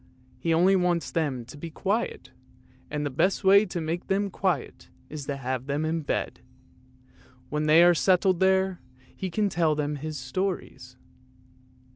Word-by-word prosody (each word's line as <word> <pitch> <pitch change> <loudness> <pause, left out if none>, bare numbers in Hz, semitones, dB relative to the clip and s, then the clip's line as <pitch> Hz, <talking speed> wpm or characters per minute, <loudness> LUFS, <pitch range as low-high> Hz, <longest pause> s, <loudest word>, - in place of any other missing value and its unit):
He 165 - -1
only 180 +4 +4
wants 180 -2 0
them 140 -8 -2
to 125 - -12
be 165 +3 -7
quiet, 200 +8 -2 0.6
and 150 0 -3
the 145 - -2
best 185 +9 +1
way 200 +2 +6
to 175 - -4
make 165 +2 -3
them 195 +1 0
quiet 175 -8 -2 0.2
is 150 -2 -7
to 140 - -3
have 130 -1 -4
them 145 +2 -1
in 160 +1 -1
bed; 145 - -3 1.1
when 150 +1 -1
they 160 +3 +7
are 175 0 +6
settled 185 +1 +2
there, 190 -1 +2 0.3
he 190 - -4
can 210 +4 0
tell 165 -4 +1
them 150 0 -2
his 155 +1 -5
stories. 180 +10 -4
165 Hz, 160 wpm, -26 LUFS, 150-190 Hz, 1.1 s, they